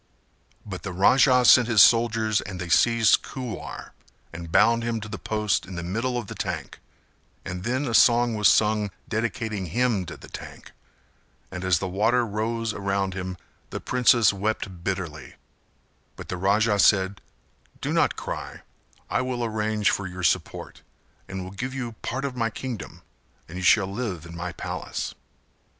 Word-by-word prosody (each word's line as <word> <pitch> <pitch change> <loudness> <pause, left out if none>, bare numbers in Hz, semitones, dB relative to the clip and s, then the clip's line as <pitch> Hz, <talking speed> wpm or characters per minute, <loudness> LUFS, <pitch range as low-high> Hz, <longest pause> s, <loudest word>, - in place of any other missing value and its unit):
But 95 -4 -6
the 95 - -5
Raja 125 +6 +5
sent 120 -1 +7
his 115 -3 +2
soldiers 115 -2 +3
and 95 -3 -7
they 90 0 -5
seized 115 +2 +4
Kuwar 125 -4 -7 0.4
and 85 0 -8
bound 115 +6 +4
him 115 -1 -2
to 105 - -7
the 105 +1 -7
post 105 -3 -1
in 95 - -8
the 85 - -4
middle 115 +8 -2
of 120 - -3
the - - -8
tank; - - -5 0.7
and 90 -1 -5
then 130 +5 -1
a 120 - -3
song 120 +1 +5
was 105 -2 +3
sung 105 -1 +3 0.2
dedicating 110 -3 -2
him 110 -1 0
to - - -8
the - - -13
tank - - -10 0.8
and 90 -1 -6
as 95 -2 +3
the 95 - -3
water 110 +6 +2
rose 110 +1 -2
around 100 -1 -1
him 95 0 -5 0.3
the - - -5
princess 120 -3 +4
wept 100 -3 -3
bitterly; 90 -5 -4 0.8
but - - -10
the 90 - -3
Raja 100 +3 +2
said 95 -1 +3 0.6
"Do - - -2
not - - +2
cry - - -6 0.4
I - - 0
will 125 -2 -2
arrange 110 -1 0
for 100 - -2
your 90 0 -7
support 85 - -1 0.5
and 95 -1 -5
will 95 - -8
give 125 +7 -5
you 120 -3 -4
part 135 +3 -3
of 135 -2 -4
my 115 -2 0
kingdom 120 0 -7 0.4
and 85 - -10
you 90 - -5
shall 95 +2 +5
live 95 -4 -4
in 85 0 -10
my 90 +1 -4
palace." - - -5
105 Hz, 165 wpm, -25 LUFS, 95-115 Hz, 0.8 s, sent